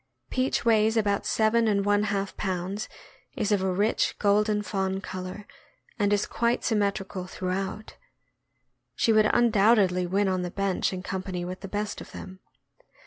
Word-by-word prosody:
Peach 255 -1 0
weighs 220 0 +3
about 205 -2 +1
seven 225 +1 +2
and 200 -2 +1
one 205 0 +2
half 200 -1 -2
pounds, 190 +2 -3 0.5
is 210 - 0
of 205 -2 +3
a 190 0 0
rich, 205 +5 +1
golden 210 +1 +2
fawn 190 -2 -2
color, 185 +1 -7 0.5
and 205 -1 +2
is 205 0 +2
quite 235 +1 0
symmetrical 200 -3 -1
through 185 0 -4
out. 195 +3 -4 1.0
She 225 - +3
would 215 0 +4
undoubtedly 205 -5 +3
win 195 +3 +1
on 185 -1 0
the 180 - -3
bench 195 0 -1
in 185 -1 -5
com 190 -1 -3
pany 180 -2 -4
with 185 +1 -6
the 195 - -7
best 205 +2 -3
of - - -12
them. 185 0 -9
200 Hz, 165 wpm, -27 LUFS, 190-215 Hz, 1.0 s, would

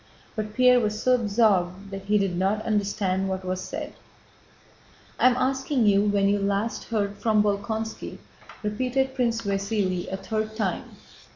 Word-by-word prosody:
But 215 -1 -4
Pierre 250 -1 +6
was 215 -2 -1
so 255 - +4
absorbed 200 -5 +1
that 195 0 -7
he 210 +1 +3
did 195 -3 0
not 195 +4 0
understand 200 -3 0
what 190 0 -3
was 185 0 -2
said. - - -6 1.3
"I - - +6
am 245 - 0
asking 265 -1 +1
you 200 0 +4
when 200 -1 +2
you 205 +1 +2
last 200 +3 -1
heard 205 -3 -2
from 215 -2 +2
Bolkónski," 215 +2 -3 0.5
repeated 255 +5 0
Prince 235 -3 0
Vasíli 195 -3 -1
a 190 - -2
third 215 +2 -3
time. 220 - -2
210 Hz, 155 wpm, -25 LUFS, 195-225 Hz, 1.3 s, Pierre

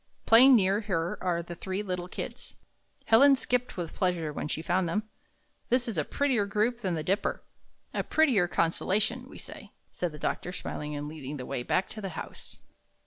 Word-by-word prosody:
Playing 255 +4 +8
near 200 -1 +3
her 175 -5 -2
are 170 -2 0
the 175 - -7
three 190 +3 -4
little 180 -2 -3
Kids." - - -7 0.5
Helen 275 +5 +7
skipped 250 -3 -1
with 170 -3 -4
pleasure 175 -5 -1
when 145 - -3
she 155 +2 -3
found 175 +1 +1
them. 210 +6 0 0.7
"This 245 0 +2
is 230 - -3
a 155 - +1
prettier 250 - +1
group 215 +4 +1
than 185 -5 -1
the 155 - -3
Dipper." 195 +6 -1 0.5
"A - - -1
prettier 255 - +3
constellation, 210 +9 0
we - - -11
say," - - -9 0.2
said 175 -2 -3
the 150 - -9
doctor, 175 +3 -2
smiling 150 -4 -4
and 145 0 -4
leading 150 -2 -6
the 125 - -6
way 125 - -3
back 185 +9 0
to 215 - -8
the 195 - -4
house. - - -8
185 Hz, 190 wpm, -29 LUFS, 165-225 Hz, 0.7 s, Playing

